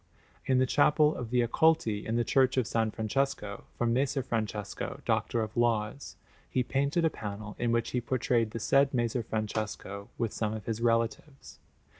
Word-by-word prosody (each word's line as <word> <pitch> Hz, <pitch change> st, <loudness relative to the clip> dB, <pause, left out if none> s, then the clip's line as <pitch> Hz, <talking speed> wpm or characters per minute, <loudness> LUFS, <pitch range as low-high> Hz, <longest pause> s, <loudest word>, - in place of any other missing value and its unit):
In 130 Hz, -, +3 dB
the 130 Hz, -, +4 dB
Chapel 150 Hz, +3 st, +4 dB
of 120 Hz, -3 st, -5 dB
the 125 Hz, 0 st, +2 dB
Accolti 120 Hz, -6 st, +2 dB
in 115 Hz, -, -2 dB
the 120 Hz, -, +2 dB
Church 130 Hz, +1 st, +2 dB
of 130 Hz, -, +4 dB
S. -, -, -7 dB, 0.2 s
Francesco, 110 Hz, -2 st, -2 dB
for 120 Hz, -, 0 dB
Messer 130 Hz, +3 st, +1 dB
Francesco, 110 Hz, -4 st, -3 dB
Doctor 115 Hz, -, +1 dB
of 110 Hz, 0 st, -4 dB
Laws, 120 Hz, +2 st, 0 dB, 0.3 s
he 125 Hz, -, +1 dB
painted 140 Hz, +6 st, +1 dB
a 160 Hz, -, +2 dB
panel 105 Hz, 0 st, -6 dB
in 120 Hz, -1 st, +1 dB
which 115 Hz, 0 st, 0 dB
he 125 Hz, -, 0 dB
portrayed 120 Hz, -2 st, +1 dB
the 115 Hz, -, -5 dB
said 140 Hz, +4 st, +3 dB
Messer 120 Hz, 0 st, 0 dB
Francesco 110 Hz, -2 st, -4 dB
with 115 Hz, -3 st, -1 dB
some 110 Hz, -1 st, -1 dB
of 105 Hz, -2 st, -7 dB
his 115 Hz, 0 st, -3 dB
relatives. 115 Hz, +4 st, -1 dB
120 Hz, 175 wpm, -30 LUFS, 110-130 Hz, 0.3 s, the